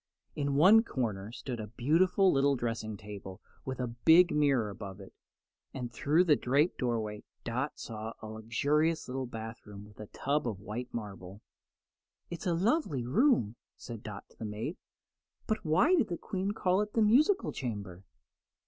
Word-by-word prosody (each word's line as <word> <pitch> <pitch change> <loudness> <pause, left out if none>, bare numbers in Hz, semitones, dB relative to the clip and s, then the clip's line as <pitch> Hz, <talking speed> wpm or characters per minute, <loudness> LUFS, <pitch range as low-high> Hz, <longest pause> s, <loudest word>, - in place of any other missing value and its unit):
In 140 -1 -1
one 190 +10 +7
corner 110 - -3
stood 120 0 -6
a 110 - -5
beautiful 165 - +3
little 140 +1 +3
dressing 115 -3 -3
table 100 -1 -9 0.3
with 130 0 -4
a 125 - 0
big 160 +9 +5
mirror 135 -8 +2
above 100 -2 -8
it, 95 - -12 0.6
and 125 -3 -4
through 160 +6 +3
a 150 - +6
draped 145 +7 +1
doorway 110 -4 -2 0.2
Dot 130 +5 -3
saw 110 0 -6
a - - -9
luxurious 145 +9 0
little 130 0 -3
bathroom 110 -3 -8
with 105 0 -18
a 105 - -7
tub 140 +3 -1
of 105 -5 -3
white 110 +5 -6
marble. 100 -3 -7 0.9
"It's 170 +1 -5
a 170 - +2
lovely 185 - +1
room," 130 - +2 0.2
said 115 -3 -8
Dot 105 -2 -8
to - - -24
the - - -6
maid; 110 - -4 0.7
"but 220 -1 -1
why 185 - +3
did 300 - +3
the 175 - -3
Queen 190 0 -3
call 185 -1 +1
it 210 0 -4
the 225 - +3
musical 300 - +4
chamber?" 100 -7 -5
125 Hz, 165 wpm, -31 LUFS, 110-165 Hz, 0.9 s, one